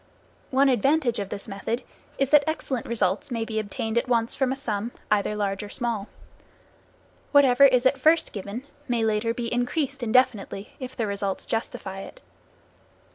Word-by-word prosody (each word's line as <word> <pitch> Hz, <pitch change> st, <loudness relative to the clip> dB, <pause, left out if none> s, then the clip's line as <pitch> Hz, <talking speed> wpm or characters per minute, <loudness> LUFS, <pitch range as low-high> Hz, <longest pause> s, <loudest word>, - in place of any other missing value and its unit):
One 275 Hz, +1 st, +4 dB
advantage 265 Hz, 0 st, +2 dB
of 200 Hz, -1 st, -4 dB
this 200 Hz, -, -5 dB
method 225 Hz, +5 st, -3 dB, 0.3 s
is 275 Hz, -1 st, 0 dB
that 295 Hz, -1 st, +7 dB
excellent 270 Hz, -6 st, -2 dB
results 205 Hz, -4 st, 0 dB
may 230 Hz, -3 st, -2 dB
be 220 Hz, -1 st, -2 dB
obtained 220 Hz, +2 st, -1 dB
at 235 Hz, -, -5 dB
once 230 Hz, -2 st, +1 dB
from 265 Hz, -2 st, 0 dB
a -, -, 0 dB
sum, 225 Hz, -4 st, -3 dB, 0.2 s
either 210 Hz, 0 st, +2 dB
large 200 Hz, -2 st, -1 dB
or 210 Hz, -, -7 dB
small. 230 Hz, -3 st, -2 dB, 1.2 s
Whatever 280 Hz, -2 st, +6 dB
is 255 Hz, -2 st, +4 dB
at 265 Hz, +1 st, +3 dB
first 315 Hz, +4 st, +3 dB
given 205 Hz, +4 st, -5 dB, 0.2 s
may 240 Hz, -3 st, +1 dB
later 220 Hz, +1 st, +1 dB
be 235 Hz, 0 st, -3 dB
increased 270 Hz, +3 st, -1 dB
indefinitely, 220 Hz, -4 st, +1 dB
if 255 Hz, -1 st, -7 dB
the 230 Hz, -, 0 dB
results 200 Hz, -1 st, -2 dB
justify 195 Hz, -4 st, -4 dB
it. -, -, -10 dB
235 Hz, 165 wpm, -25 LUFS, 210-260 Hz, 1.2 s, that